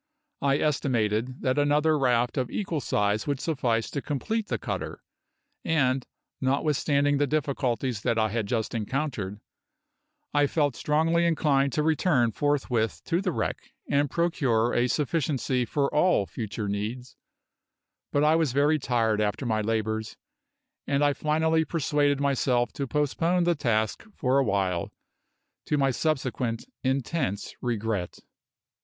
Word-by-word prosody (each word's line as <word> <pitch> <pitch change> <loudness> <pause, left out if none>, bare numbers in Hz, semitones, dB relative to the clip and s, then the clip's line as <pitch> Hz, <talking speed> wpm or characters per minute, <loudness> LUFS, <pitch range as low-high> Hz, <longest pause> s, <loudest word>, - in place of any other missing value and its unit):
I 140 0 +3
estimated 125 -5 0
that 130 +2 +1
another 150 +2 +3
raft 125 -4 +2
of 130 -2 -1
equal 175 -8 -2
size 105 0 0
would 140 -2 -1
suffice 120 -8 -1
to 140 - -3
complete 210 - -2
the - - -1
cutter, - - -5 0.6
and, 135 -5 +1 0.3
notwithstanding 145 +1 +1
the 145 - +2
difficulties 130 -5 -1
that 115 - 0
I 110 -1 +2
had 110 -1 -2
just 115 -1 -1
encountered, 115 -3 -3 0.9
I 145 -1 +4
felt 145 -4 +1
strongly 165 +3 +2
inclined 140 -4 +2
to 150 - +1
return 155 -6 +2
forthwith 120 - 0
to 170 +2 0
the 190 -2 0
wreck - - -4
and 140 0 +2
procure 130 -9 +1
a 120 +1 +2
sufficiency 135 -3 0
for 140 +3 -1
all 150 - +3
future 105 0 -5
needs; 110 +5 -4 1.0
but 145 - +2
I 155 +1 +5
was 160 -6 +1
very 145 +3 +3
tired 115 -5 +1
after 105 +5 -1
my 110 -2 +1
labours, 110 0 -2 0.7
and 140 +1 +1
I 145 - +3
finally 160 +2 +1
persuaded 145 -3 +1
myself 130 -3 +1
to 140 - -3
postpone 165 +5 +1
the 175 0 +3
task 115 -8 0
for 130 -1 +2
a - - +3
while 95 -6 0 0.8
to 150 - +1
my 135 -1 +2
subsequent 130 -4 -1 0.2
intense 130 - -1
regret. 110 -6 -2
135 Hz, 135 wpm, -27 LUFS, 115-150 Hz, 1.0 s, I